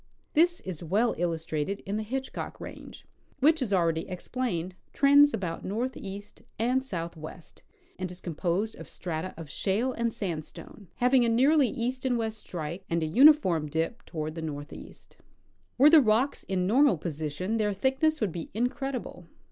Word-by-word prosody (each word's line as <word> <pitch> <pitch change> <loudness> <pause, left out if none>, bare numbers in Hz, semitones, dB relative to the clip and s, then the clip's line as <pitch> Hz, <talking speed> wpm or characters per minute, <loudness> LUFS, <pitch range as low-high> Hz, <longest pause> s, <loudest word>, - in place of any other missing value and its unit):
This 345 +3 +3
is 185 -5 -6
well 210 +8 +2
illustrated 165 +2 -2
in 200 +1 -3
the 215 - -1
Hitchcock 260 +5 -5
range, - - -10 0.3
which, 310 +3 +4
as 235 -6 -1
already 165 -3 +1
explained, 185 -2 -3 0.2
trends 285 +1 +6
about 180 -8 -4
northeast 205 -2 -5 0.2
and 250 +4 +1
southwest, 170 -6 -7 0.4
and 185 -1 -3
is 180 +1 -9
composed 180 +5 -2
of - - -10
strata 170 +1 -4
of 165 -2 -8
shale 215 - -1
and 235 -1 -1
sandstone, 190 -1 -6
having 250 +1 +4
a 235 - +2
nearly 270 +5 +4
east 245 +3 -3
and 255 -2 +1
west 220 -1 -3
strike 170 0 -6
and 170 -1 0
a - - +1
uniform 185 - +5
dip 165 +10 -2
toward 155 -2 -4
the 165 - -6
northeast. 145 -1 -8 0.3
* - - -40
Were 285 +4 +7
the 320 -2 +9
rocks 235 +4 +1
in 185 -2 -1
normal 255 - +4
position 160 +6 -3
their 210 -2 +1
thickness 265 +9 +1
would 210 -5 +1
be 165 0 -6
incredible. 250 -6 -3
205 Hz, 160 wpm, -28 LUFS, 170-255 Hz, 0.4 s, the